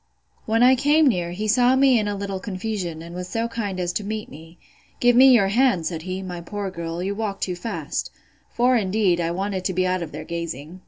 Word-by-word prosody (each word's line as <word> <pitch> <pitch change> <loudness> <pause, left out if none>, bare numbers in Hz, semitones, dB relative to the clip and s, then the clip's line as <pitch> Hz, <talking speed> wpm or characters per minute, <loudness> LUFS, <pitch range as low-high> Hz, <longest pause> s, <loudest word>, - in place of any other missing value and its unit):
When 225 +2 +3
I 255 +1 +7
came 295 +4 +3
near, 180 -8 +1
he 200 +5 -4
saw 245 +3 +4
me 265 -3 +4
in 210 - -1
a 205 - -2
little 195 -1 -4
confusion, 185 -5 -4
and 170 +1 -10
was 180 0 -6
so 230 +3 -1
kind 210 -5 -4
as 175 -1 -2
to 210 - -2
meet 215 +1 -5
me: 165 +3 -13 0.4
Give 245 0 +4
me 260 +2 +8
your 205 -6 +4
hand, 225 -6 +2
said 165 -2 -3
he, 185 +2 -5
my 180 -2 -6
poor 200 +2 -5
girl; 170 0 -5
you 195 +2 -2
walk 200 -2 -4
too 180 - -2
fast, 220 +6 -4 0.4
(for, 250 +2 +3
indeed, 195 -4 +1
I 165 - -1
wanted 190 +2 -3
to 190 - 0
be 185 0 +1
out 185 0 0
of 165 -3 -5
their 155 +2 -7
gazing). 170 0 -6
195 Hz, 230 wpm, -23 LUFS, 175-225 Hz, 0.4 s, me